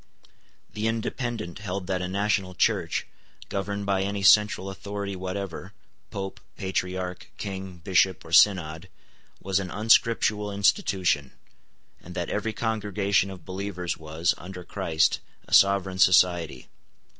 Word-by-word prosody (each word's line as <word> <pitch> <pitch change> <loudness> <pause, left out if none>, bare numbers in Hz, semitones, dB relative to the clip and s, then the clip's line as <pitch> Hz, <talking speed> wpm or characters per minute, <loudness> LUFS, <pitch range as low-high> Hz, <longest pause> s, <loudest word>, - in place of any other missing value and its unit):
The 110 +1 -1
Independent 115 -3 -3
held 100 -2 -4
that 95 -1 -1
a 90 - -2
national 100 -1 0
Church, - - +1 0.4
governed 100 +1 -3
by 100 -1 +1
any 100 0 -2
central 105 -1 +5
authority 100 0 -5
whatever, 95 0 -5 0.4
Pope, 95 -1 -5 0.2
Patriarch, 90 -1 -3
King, 95 -2 -6
Bishop, 95 +2 +1
or 80 - -11
Synod, 90 -2 +4 0.5
was 95 0 +1
an 95 -2 -4
unscriptural 105 -1 +2
institution, 95 - +1 0.7
and 90 +1 -11
that 85 -1 -3
every 110 +2 -1
congregation 105 -3 0
of 95 -3 -10
believers 95 -2 -4
was, 80 +1 -1
under 90 +1 -8
Christ, 80 -2 +1 0.3
a - - -8
sovereign 95 -1 +4
society. 85 -7 +3
95 Hz, 120 wpm, -26 LUFS, 90-100 Hz, 0.7 s, central